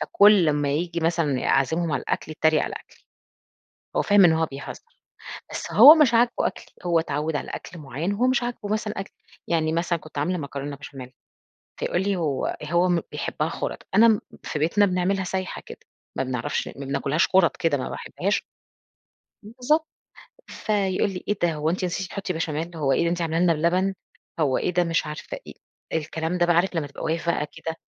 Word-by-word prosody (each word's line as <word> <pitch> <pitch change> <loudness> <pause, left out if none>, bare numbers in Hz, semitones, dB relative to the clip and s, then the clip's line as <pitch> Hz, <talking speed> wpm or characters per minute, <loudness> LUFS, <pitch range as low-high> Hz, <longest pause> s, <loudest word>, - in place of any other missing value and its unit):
فكل 200 -5 +5
أمّا 145 -1 +1
ييجي 170 +3 -1
مثلًا 160 -5 0
أعزمهم 160 +4 +1
على 140 - 0
الأكل 155 - -3
يتريّق 155 0 +2
على - - -3
أكلي. - - -14 0.9
هو - - +3
فاهم 205 -2 +5
إن 165 - +5
هو 160 0 +2
بيهزّر، 140 -2 -8 0.7
بس - - -5
هو 300 - +10
مش 295 -7 +4
عاجبه 235 +1 +4
أكلي، - - -7 0.2
هو 170 -1 +3
اتعوّد 160 -1 -2
على 145 - -3
أكل 170 - -8
معيّن، 150 +7 -3
هو 240 +5 +1
مش 255 -1 +2
عاجبه 240 -4 -4
مثلًا 215 -1 -2
أكلي. 195 - -7 0.3
يعني 160 -2 +1
مثلًا 170 0 0
كنت 155 -1 -12
عاملة 175 +6 0
مكرونة 140 -1 -5
بشاميل، 135 -2 -10 0.7
فيقول 175 - 0
لي 200 +1 0
هو 150 -7 -1
هو 170 +4 +2
م 175 -2 +2
بيحبّها - - -2
خُرَط، - - -5
أنا 220 -1 +6 0.2
في 150 - -4
بيتنا 170 +7 +3
بنعملها 190 +1 0
سايحة 185 0 -4
كده، - - -10 0.4
ما 130 - 0
بنعرفش 130 +2 -2
ما - - -7
بناكلهاش 140 +4 +1
خُرَط 185 -3 +3
كده 165 -5 +1
ما 130 - -4
باحبهاش 200 +3 -2 1.0
بالضبط، 250 +9 0 0.6
فيقول 200 -2 0
لي: 185 -2 -6
:إيه 205 - 0
ده؟ 170 -1 +3
هو 155 +1 -1
أنتِ 185 +2 -1
نسيتِ 180 +1 -3
تحُطّي 190 0 -4
بشاميل؟ 165 +1 -3
هو 145 -4 0
إيه - - +2
ده 170 - +1
أنتِ 175 0 -2
عامله 165 -1 -1
لنا 175 -1 +4
لنا 165 +1 +2
بلبن؟ 190 +2 +1 0.5
هو 140 -5 +2
إيه - - -1
ده،" 180 +1 +3
مش 170 -1 0
عارفة 150 - -6
إيه، - - -9 0.4
الكلام 160 +2 -2
ده 175 - +3
بقى 175 -1 +3
عارف 180 +2 +2
لمّا 155 -3 -1
تبقى 140 - -9
واقف 165 +1 -1
بقى 150 -3 0
كده 165 0 -5
170 Hz, 195 wpm, -24 LUFS, 150-190 Hz, 1.0 s, هو